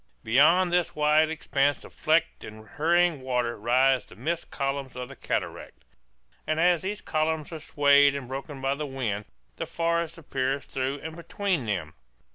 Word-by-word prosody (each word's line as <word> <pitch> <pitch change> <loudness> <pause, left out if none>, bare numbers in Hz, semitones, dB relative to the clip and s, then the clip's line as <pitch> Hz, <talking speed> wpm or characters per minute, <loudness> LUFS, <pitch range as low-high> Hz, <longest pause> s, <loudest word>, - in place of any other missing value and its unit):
Beyond 165 +10 +4
this 175 -1 +1
wide 150 +1 +4
expanse 145 -3 0
of - - -13
flecked 160 +2 +1
and 110 0 -11
hurrying 170 +1 +2
water 125 -2 -1
rise 130 +4 +3
the - - -16
mist 170 +1 -3
columns 135 -1 -3
of 125 0 -6
the 140 - -10
cataract; - - -4 0.6
and 155 0 0
as 175 0 +4
these 205 +2 -4
columns 155 0 -1
are 160 - -6
swayed 145 -1 +4
and 140 -3 -5
broken 135 +2 -6
by 135 +1 +1
the 150 +1 -4
wind 115 -7 -3 0.3
the - - -4
forest 170 0 -1
appears 135 -3 -2
through 135 +2 -3
and 160 0 -6
between 170 - -2
them. 90 -7 -2
145 Hz, 165 wpm, -27 LUFS, 130-160 Hz, 0.6 s, Beyond